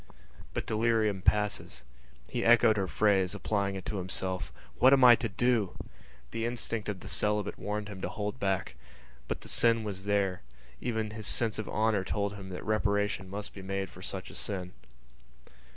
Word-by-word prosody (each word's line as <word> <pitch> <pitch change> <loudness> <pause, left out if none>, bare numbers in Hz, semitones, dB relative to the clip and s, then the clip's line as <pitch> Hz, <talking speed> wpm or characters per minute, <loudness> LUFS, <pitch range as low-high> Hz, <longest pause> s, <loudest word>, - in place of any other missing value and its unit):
But - - -2
delirium 110 -3 +1
passes. 105 +2 0 0.4
He - - -2
echoed 115 -2 +6
her 95 -3 0
phrase, 100 -2 +2
applying 100 0 -1
it 95 - -6
to 105 - -3
himself: 95 +1 -2 0.3
"What 130 +2 +7
am 135 -2 +5
I 125 -1 +10
to 115 - -2
do?" 115 -1 +1 0.5
The 115 - -3
instinct 115 -2 -2
of 95 -3 -4
the - - -8
celibate 105 -1 0
warned 105 0 -3
him 100 -2 -8
to - - -2
hold 105 +4 -4
back. 95 -1 -1 0.5
But - - -3
the - - -10
sin 115 -1 +4
was 100 -2 -5
there; 100 -3 +1 0.4
even 110 -3 -2
his 110 -1 -2
sense 110 -2 +2
of 110 - -4
honour 110 -2 +1
told 100 +1 -1
him 100 -2 -9
that 90 0 -7
reparation 100 -2 0
must 105 +2 -6
be 100 - -9
made 95 -1 -3
for 90 - -12
such 95 0 -4
a - - -11
sin. 90 -3 -3
105 Hz, 180 wpm, -30 LUFS, 95-110 Hz, 0.5 s, I